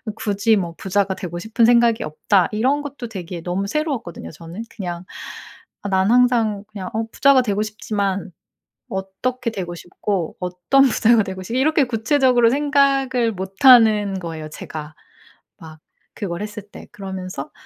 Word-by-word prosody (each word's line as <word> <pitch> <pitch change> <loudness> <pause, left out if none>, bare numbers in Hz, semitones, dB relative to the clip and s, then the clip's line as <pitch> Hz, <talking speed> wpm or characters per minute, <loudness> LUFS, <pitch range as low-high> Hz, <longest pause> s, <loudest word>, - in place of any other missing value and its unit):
"굳이 210 +1 +1
뭐 170 -4 -3
부자가 195 0 0
되고 175 -2 -6
싶은 225 +4 +1
생각이 235 -1 +4
없다." 175 +5 +1
이런 265 +7 +1
것도 275 -5 -7
되게 180 -4 -7
너무 185 +3 -2
새로웠거든요 235 - -3
저는. 170 +6 -9
그냥 175 -4 -5 0.8
'아 200 - -3
난 190 +1 +2
항상 235 -5 +3
그냥 195 -3 -6
어 220 +1 -1
부자가 275 -2 +5
되고 205 -2 -1
싶지만 200 -3 -3 0.6
어떻게 230 +6 -3
되고 175 -5 -5
싶고 175 0 -4
어떤 180 +9 +2
부자가 230 -3 +4
되고 190 -1 -6
싶' 230 +7 -5
이렇게 295 +2 +3
구체적으로 245 0 +3
생각을 275 -4 +2
못 190 +5 -5
하는 215 -6 +6
거예요 160 -3 -6
제가. 155 0 -8 0.6
막 160 -1 -12 0.4
그걸 175 -2 -4
했을 210 -1 -7
때. - - -11
그러면서 190 -7 -7
205 Hz, 315 characters per minute, -21 LUFS, 185-240 Hz, 0.8 s, 하는